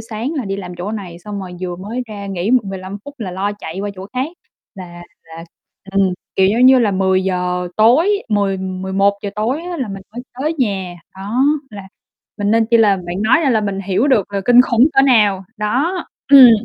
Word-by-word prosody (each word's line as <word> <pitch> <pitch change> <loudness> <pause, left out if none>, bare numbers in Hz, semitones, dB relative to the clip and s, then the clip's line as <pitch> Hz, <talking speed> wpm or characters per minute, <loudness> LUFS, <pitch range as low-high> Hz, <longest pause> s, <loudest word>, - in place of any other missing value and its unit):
sáng 225 +5 -5
là 275 -7 -3
đi 195 0 -3
làm 185 -2 -7
chỗ 200 +5 -4
này, 185 -6 -7
xong 200 +2 -7
rồi 185 -1 -8
vừa 180 -1 -4
mới 220 +7 -5
ra 200 -2 -7
nghỉ 195 +1 -2
m 255 - +6
15 195 0 -7
phút 285 0 -10
là 200 -6 -5
lo 195 +3 -2
chạy 175 +2 -6
qua 205 - -3
chỗ 190 +1 -9
khác 260 +4 -1 0.5
là 175 -2 -10 0.2
là 165 0 -11 0.5
ừm, 195 -2 +2 0.2
kiểu, 190 0 +4
giống 240 +5 +4
như 260 0 +7
là, 225 -4 +2
10:00 185 -2 0
tối, 320 - +4
10:00-11:00 195 0 -1
tối 245 +10 -2
á 355 0 -5
là 260 -8 -3
mình 195 -1 -7
mới 245 - -7 0.2
tới 305 +4 -1
nhà. 195 -7 -1 0.2
Đó, 215 +8 -1 0.3
là 200 -2 -10 0.5
mình 205 0 0
nên 225 0 +3
chi 235 - +3
là 210 -3 +4
bạn 180 +1 -5
nói 240 +9 +4
ra 290 -5 +2
là 220 -3 +2
mình 200 -2 -3
hiểu 200 +7 0
được 210 -7 +1
là 200 - -1
kinh 245 0 +7
khủng 250 +3 +4
cỡ 270 - +4
nào. 210 -7 +3
Đó. 275 - -1 0.3
Ừm. 265 -3 +10
205 Hz, 210 wpm, -17 LUFS, 190-240 Hz, 0.5 s, Ừm